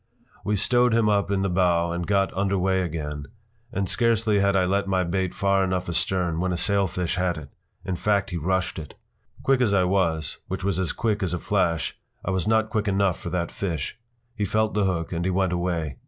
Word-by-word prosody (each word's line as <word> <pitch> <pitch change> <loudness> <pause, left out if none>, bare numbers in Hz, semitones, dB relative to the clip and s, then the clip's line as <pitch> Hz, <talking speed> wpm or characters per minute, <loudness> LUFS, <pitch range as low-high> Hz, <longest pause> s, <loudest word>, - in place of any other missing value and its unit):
p> - - -39 0.2
We 105 - 0
stowed 120 +3 +3
him 115 -2 +3
up 100 -1 +2
in 100 -1 +1
the - - +1
bow 85 -2 +2
and 85 0 -3
got 100 -1 +2
under 100 +1 0
way 95 0 +1
again, 75 -4 -4 0.4
and 100 -1 -1
scarcely 115 -1 +2
had 100 0 +2
I 95 -1 +3
let 100 +2 0
my 95 -1 +1
bait 95 +1 -1
far 100 0 +2
enough 90 -1 -1
astern 85 -1 0
when 90 +1 0
a 90 - -1
sailfish 90 -2 +1
hit 90 -2 0
it. 75 -3 -9 0.4
In 95 - -2
fact, 100 +1 0
he 90 - -2
rushed 95 +2 -1
it. 75 -4 -9 0.5
Quick 135 -1 +3
as 105 -5 +3
I 95 - +4
was, 85 -5 0
which 95 0 -4
was 95 -2 0
as 95 - 0
quick 110 -2 -1
as 90 -2 0
a - - -2
flash, 85 -4 0 0.3
I 95 - 0
was 95 +1 -1
not 110 0 +2
quick 110 -2 0
enough 100 -2 +1
for - - -5
that 85 -2 -2
fish. 85 -6 -3 0.4
He 105 - -2
felt 110 +2 +1
the 105 -1 +2
hook 85 -2 -1
and 85 0 -2
he 95 - 0
went 95 -1 +1
away. 85 -6 -2
95 Hz, 225 wpm, -25 LUFS, 85-100 Hz, 0.5 s, I